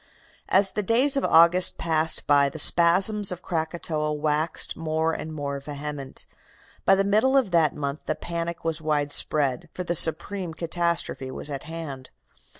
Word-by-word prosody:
"As 195 +1 +3
the 210 - -3
days 250 +8 +2
of 275 - -1
August 170 +3 +4
passed 160 -1 +1
by 140 -1 +3
the 150 - -10
spasms 185 +6 +4
of 180 0 -8
Krakatoa 160 -2 -3
waxed 150 +2 -2
more 160 0 -2
and 160 - -6
more 140 -2 -5
vehement. 145 -1 -7 0.6
By 195 - +5
the 195 - +1
middle 215 +7 +2
of 245 -8 0
that 165 -3 +2
month 140 0 -5
the 155 - -1
panic 170 0 -6
was 165 -1 -2
widespread, 145 -3 0
for 180 - -4
the 175 - -3
supreme 170 +2 +2
catastrophe 170 -5 -2
was 145 - -4
at 135 -1 -6
hand. 160 -5 -8
160 Hz, 155 wpm, -24 LUFS, 150-180 Hz, 0.6 s, By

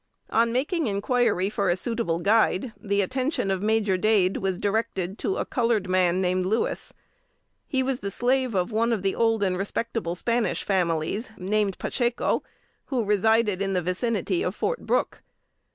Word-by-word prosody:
On 230 +1 +3
making 295 +5 0
inquiry 210 -1 +1
for 200 -3 0
a 175 - +3
suitable 220 -4 -1
guide, 215 +4 +2
the 200 -2 0
attention 255 - -1
of 190 -1 -1
Major 210 -2 +2
Dade 195 -2 +2
was 190 -2 -1
directed 200 -2 -2
to 390 - -1
a - - -1
colored 230 -6 0
man 185 -1 +2
named 185 0 +1
Louis. 215 +5 -1 0.8
He 265 -3 0
was 260 -1 -1
the 200 - -4
slave 250 +2 0
of 185 +4 0
one 230 +2 +1
of 205 -4 -2
the 195 - +1
old 225 -2 +2
and 185 -2 +1
respectable 200 -1 -2
Spanish 235 +4 0
families, 180 +3 0
named 200 +1 0
Pacheco, 240 -2 0 0.4
who 245 -5 -1
resided 210 -1 +2
in 195 -1 0
the 180 - +1
vicinity 185 0 -1
of 185 - -2
Fort 485 - -2
Brooke. - - 0
210 Hz, 165 wpm, -25 LUFS, 185-235 Hz, 0.8 s, On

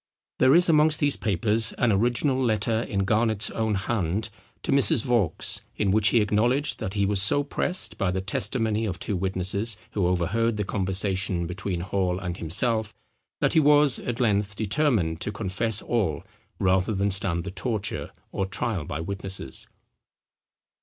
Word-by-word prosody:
There 130 +3 +5
is 175 +1 +5
amongst 155 -2 +4
these 145 -1 +2
papers 105 +1 +1
an 125 - +1
original 120 +6 +1
letter, 110 -1 +1
in 100 -4 -2
Garnet's 110 0 +1
own 110 -2 -1
hand, 100 0 -2 0.3
to - - -2
Mrs. 140 -2 +4
Vaux, 115 - 0
in 100 -2 0
which 105 +1 +3
he 115 - +4
acknowledged 120 +8 +1
that 105 -3 -4
he 100 -1 +1
was 100 -1 +1
so 145 +8 +1
pressed 180 +6 -2
by 100 - +1
the 95 +1 -1
testimony 110 +3 0
of 90 -3 -3
two 100 - -2
witnesses 95 +4 -1
who 95 -4 0
overheard 105 +6 0
the 105 - -1
conversation 95 -2 -1
between 90 0 -3
Hall 95 -1 -1
and 90 -2 -5
himself, 110 +6 0 0.5
that - - +2
he - - +5
was, 150 -2 +4
at 120 +1 -4
length, 105 -3 +1
determined 105 - 0
to 105 - -1
confess 105 +2 -1
all 100 -11 -1 0.3
rather 95 +2 +1
than 100 +1 0
stand 90 -3 +1
the 95 - -6
torture 100 +2 -3 0.2
or 95 - -2
trial 95 -3 -2
by 75 +3 -5
witnesses. 95 -5 -4
105 Hz, 160 wpm, -25 LUFS, 95-115 Hz, 0.5 s, There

